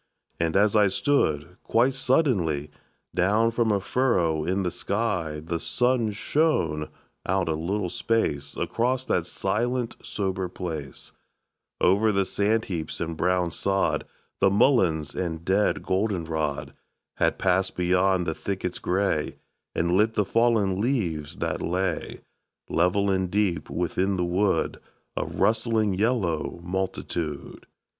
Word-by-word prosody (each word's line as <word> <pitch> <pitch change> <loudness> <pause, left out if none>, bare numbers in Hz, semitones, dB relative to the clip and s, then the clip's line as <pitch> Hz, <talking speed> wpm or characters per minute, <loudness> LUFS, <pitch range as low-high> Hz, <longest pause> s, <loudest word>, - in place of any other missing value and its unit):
And 85 -1 0
as 105 +2 +4
I 105 -1 +6
stood, 90 - 0
quite 120 +4 +2
suddenly, 100 - +1 0.4
Down 105 +5 +3
from 115 -1 +1
a 100 - +2
furrow 90 -9 +1
in 95 +4 0
the 90 - -1
sky 95 -8 -2
The 85 0 -2
sun 125 +3 +1
shone 100 - 0 0.4
out 95 -1 +1
a 80 - +1
little 90 +4 -2
space 75 -12 -1
Across 125 +2 0
that 85 -1 0
silent 115 +7 -1
sober 95 -2 -3
place, 80 -6 -4 0.7
Over 105 +4 +4
the 100 -1 +1
sand 110 +4 +1
heaps 80 -5 -4
and 85 -1 -3
brown 90 +1 +1
sod, 95 +2 0 0.3
The 100 - +5
mulleins 95 - +3
and 85 -2 -4
dead 100 +2 +2
goldenrod, 85 -7 -1 0.5
And - - +2
passed 95 0 +1
beyond 90 +1 +2
the 80 - -1
thickets 95 0 -4
gray, 90 -5 0 0.4
And 85 +1 +1
lit 105 +5 +3
the 105 - +2
fallen 110 -4 +2
leaves 85 - -1
that - - -2
lay, 95 +3 -2 0.5
Level 95 +4 +2
and 95 -1 0
deep 100 -3 0
within 90 +3 0
the 90 - 0
wood, 95 +3 0 0.4
A - - -1
rustling 110 -2 +1
yellow 95 -7 0
multitude. 90 -4 -4
95 Hz, 130 wpm, -26 LUFS, 85-110 Hz, 0.7 s, I